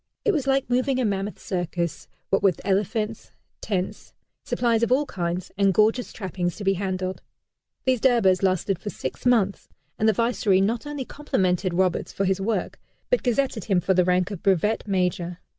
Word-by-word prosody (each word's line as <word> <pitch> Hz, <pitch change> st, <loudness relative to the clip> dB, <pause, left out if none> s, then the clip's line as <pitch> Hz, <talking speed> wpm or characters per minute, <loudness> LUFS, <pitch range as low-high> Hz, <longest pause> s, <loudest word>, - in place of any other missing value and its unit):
It 430 Hz, -, +4 dB
was 290 Hz, -8 st, -1 dB
like 270 Hz, 0 st, +2 dB
moving 255 Hz, +2 st, +1 dB
a 255 Hz, -, +1 dB
mammoth 200 Hz, 0 st, -2 dB
circus, 175 Hz, -2 st, -3 dB, 0.2 s
what 195 Hz, -, +3 dB
with 190 Hz, -5 st, +2 dB
elephants, 210 Hz, +3 st, -1 dB, 0.3 s
tents, 190 Hz, -3 st, -3 dB, 0.3 s
supplies 235 Hz, -2 st, +1 dB
of 235 Hz, -, +1 dB
all 280 Hz, +3 st, +3 dB
kinds, 175 Hz, -5 st, -3 dB
and 195 Hz, -2 st, +3 dB
gorgeous 220 Hz, +4 st, +2 dB
trappings 180 Hz, -3 st, -3 dB
to 210 Hz, -, -7 dB
be 195 Hz, 0 st, +3 dB
handled. 185 Hz, -1 st, -3 dB, 0.6 s
These 255 Hz, -3 st, +2 dB
Durbars 225 Hz, -8 st, +4 dB
lasted 190 Hz, -1 st, +1 dB
for 205 Hz, -, -5 dB
six 245 Hz, -, -5 dB
months, 210 Hz, -6 st, +2 dB, 0.3 s
and 220 Hz, -, +4 dB
the -, -, +3 dB
Viceroy 225 Hz, -3 st, +2 dB
not 225 Hz, +7 st, 0 dB
only 290 Hz, -3 st, -4 dB
complimented 185 Hz, -, -1 dB
Roberts 185 Hz, -1 st, +1 dB
for 195 Hz, -, -1 dB
his 190 Hz, 0 st, +1 dB
work, 220 Hz, +3 st, -2 dB, 0.3 s
but -, -, +3 dB
gazetted 250 Hz, -3 st, 0 dB
him 195 Hz, -4 st, +2 dB
for 190 Hz, +2 st, +1 dB
the 180 Hz, 0 st, +4 dB
rank 180 Hz, +2 st, +1 dB
of 195 Hz, -, -6 dB
Brevet 200 Hz, +3 st, +1 dB
Major. 180 Hz, -2 st, -1 dB
195 Hz, 175 wpm, -24 LUFS, 185-235 Hz, 0.6 s, It